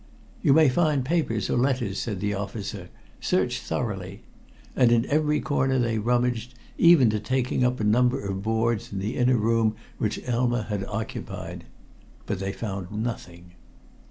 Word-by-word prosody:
"You 135 - +4
may 155 +1 +6
find 145 -1 +2
papers 130 - 0
or - - 0
letters," 125 -6 0
said 105 -6 -3
the 105 0 0
officer. 100 -2 -5 0.3
"Search - - 0
thoroughly." - - -4 0.5
And 125 -2 +4
in 115 -1 +3
every 150 0 +1
corner 135 -3 +1
they 115 -3 +1
rummaged, 120 +1 0 0.2
even 165 -9 +6
to 105 - -1
taking 125 +3 0
up 125 0 +1
a - - -1
number 125 +5 +3
of 95 -1 -3
boards 110 +1 0
in 100 - -5
the 100 +5 -3
inner 125 0 +3
room 110 0 +2 0.2
which 105 -1 -1
Elma 120 -1 +1
had 105 -3 -3
occupied. 110 +2 -6 0.6
But 100 - -3
they 95 0 -2
found 95 -3 -5
nothing. 90 -6 -5
115 Hz, 155 wpm, -25 LUFS, 105-125 Hz, 0.6 s, may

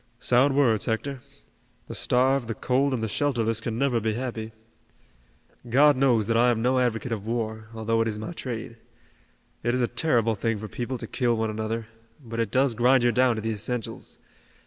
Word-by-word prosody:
"Sound 135 +3 +3
words, 120 -7 +3
Hector. 130 +4 -2 0.7
The - - -8
starved, 130 0 +1
the 115 - -3
cold 135 +2 +1
and 120 -4 -2
the - - 0
shelterless 115 -3 0
can 115 -1 -3
never 130 -2 +1
be 110 -1 -1
happy. 115 -3 -4 1.2
God 145 +4 +5
knows 125 -5 +3
that 115 - 0
I 120 +2 +5
am 120 -2 +1
no 125 +3 +2
advocate 120 -1 -1
of 110 -2 -4
war, 110 -2 -3
although 115 +1 0
it 115 - +1
is 105 -1 -3
my 110 +9 -5
trade. 115 -7 -6 0.8
It 120 +2 0
is 125 - +1
a 120 - +2
terrible 120 -3 +1
thing 115 +1 -1
for 110 +1 -6
people 120 +5 -4
to - - -7
kill 120 -3 0
one 110 0 -1
another, 110 +1 -3 0.3
but 115 -4 -7
it 115 -3 0
does 130 +2 +2
grind 125 +2 +4
you 120 - +4
down 125 -1 +3
to 110 - -5
the 115 - -1
essentials. 110 +2 -5
115 Hz, 195 wpm, -26 LUFS, 110-130 Hz, 1.2 s, God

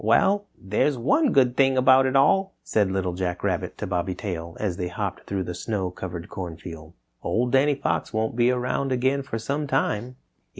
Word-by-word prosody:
"Well, 205 +1 +3
there's 105 +9 0
one 275 - +2
good 125 -6 +3
thing 135 -1 +3
about 130 +1 +6
it 130 - -1
all," 190 +8 +3
said 105 -3 +1
Little 95 -2 -1
Jack 90 -1 -3
Rabbit - - -1
to - - -4
Bobby 90 0 -2
Tail 85 -4 -5
as 95 -5 -2
they 90 -2 -2
hopped 90 - -5
through 95 -1 -2
the 90 - -5
snow 95 +1 -3
covered 90 -1 -6
corn 90 -5 -6
field, 80 -3 -10 0.3
"Old 120 +1 0
Danny 140 +2 +4
Fox - - -2
won't 110 +1 -1
be 120 0 +3
around 125 +2 -1
again 130 +2 +1
for 130 -4 -5
some 145 +6 -2
time." 125 -2 -1
115 Hz, 195 wpm, -25 LUFS, 90-135 Hz, 0.3 s, about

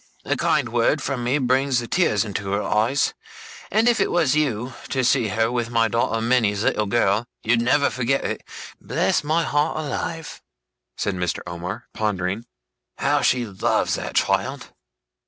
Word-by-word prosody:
A - - +1
kind 140 -4 +1
word 120 +6 +2
from 135 -2 -3
me 125 +4 +1
brings 130 0 +2
the 120 -1 -2
tears 115 - +2
into 100 -1 -4
her 105 +1 0
eyes; 115 +6 +1 0.6
and 220 +4 +2
if 240 -2 +3
you - - +2
was 165 -6 +2
to 130 -1 -1
see 120 -2 +3
her 110 +3 0
with 120 -2 -1
my 115 -1 +2
daughter 115 +1 0
Minnie's 110 -3 +1
little 105 -2 +1
girl, 105 +1 +1 0.2
you'd 115 +1 +2
never 140 +4 +3
forget 130 +2 0
it. - - -3 0.4
Bless - - 0
my 160 +3 +1
heart 150 +1 0
alive!' 155 +1 -4 0.6
said 100 - -1
Mr. 90 -2 -2
Omer, 90 +6 -6
pondering, 105 0 -2 0.5
'how - - +1
she 125 -1 +2
loves 100 -4 0
that - - -4
child! - - 0
120 Hz, 160 wpm, -23 LUFS, 105-140 Hz, 0.6 s, if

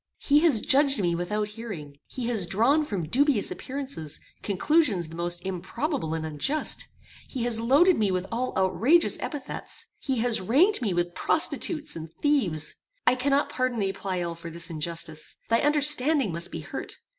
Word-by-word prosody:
He 290 +1 +3
has 300 -9 +3
judged 280 -1 +4
me 175 -3 0
without 210 +5 -2
hearing. 200 -11 -8
He 250 - -6
has 215 -7 +1
drawn 245 - +2
from 190 - -4
dubious 270 - +2
appearances, 260 - -4 0.2
conclusions 205 - +1
the 165 - -10
most 175 +1 -2
improbable 190 - -3
and 160 -1 -4
unjust. 160 - 0 0.4
He 255 -4 -4
has 235 -2 0
loaded 285 +9 +4
me 210 -2 +2
with 185 0 -1
all 245 +3 -2
outrageous 235 - +3
epithets. 290 -4 -4
He 265 -3 -2
has 235 -2 +2
ranked 285 - +3
me 215 -5 0
with 175 0 -1
prostitutes 310 - 0
and 160 -1 -8
thieves. 220 - 0 0.3
I - - +5
cannot 275 +3 +1
pardon 255 -2 -1
thee, 195 -2 -1
Pleyel, 180 -3 -3
for 170 0 -8
this 170 +1 -4
injustice. 155 -1 -1
Thy 230 0 +3
understanding 295 - +5
must 170 +1 -5
be - - -6
hurt. - - -7
225 Hz, 165 wpm, -26 LUFS, 175-280 Hz, 0.4 s, I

